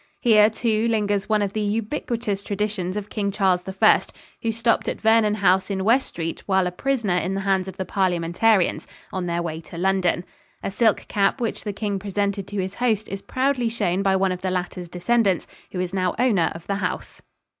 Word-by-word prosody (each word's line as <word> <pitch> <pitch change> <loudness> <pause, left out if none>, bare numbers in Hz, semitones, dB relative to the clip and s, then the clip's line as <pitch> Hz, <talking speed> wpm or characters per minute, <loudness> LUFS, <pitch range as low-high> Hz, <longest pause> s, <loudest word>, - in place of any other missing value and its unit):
Here, 215 -3 +6
too, 220 0 0
lingers 205 -3 0
one 215 -1 +3
of 200 -1 -3
the 215 - -1
ubiquitous 220 0 -2
traditions 200 -2 -2
of 210 -1 -6
King 205 -2 -1
Charles 190 -3 +2
I, 190 0 +4 0.4
who 230 - 0
stopped 230 +1 +1
at - - -2
Vernon 220 -1 +4
House 190 -2 +2
in 190 -1 -1
West 240 +6 +3
Street 165 -1 -5
while 190 -2 +3
a 180 - -1
prisoner 225 -3 0
in 185 +2 -1
the 195 - -2
hands 190 -1 +1
of 190 0 -8
the 190 - -3
Parliamentarians 185 +2 +1 0.3
on 185 -2 -2
their 170 0 -1
way 160 -1 -4
to 165 +1 -11
London. 185 -1 +1 0.4
A - - -2
silk 220 +1 +2
cap 200 +5 +1
which 230 -3 -2
the 210 - -3
king 205 -1 -3
presented 200 0 -2
to 205 - -4
his 185 0 -2
host 220 -2 0
is 195 0 -5
proudly 255 -1 0
shown 195 -5 0
by 195 -1 +2
one 190 0 +2
of 180 0 -4
the 190 - -1
latter's 180 -1 -3
descendants, 195 +1 +1 0.3
who 180 - -4
is 180 0 -2
now 185 -2 0
owner 220 -8 +2
of 165 - -9
the 200 - -1
house. 185 -3 -4
200 Hz, 205 wpm, -23 LUFS, 185-215 Hz, 0.4 s, Here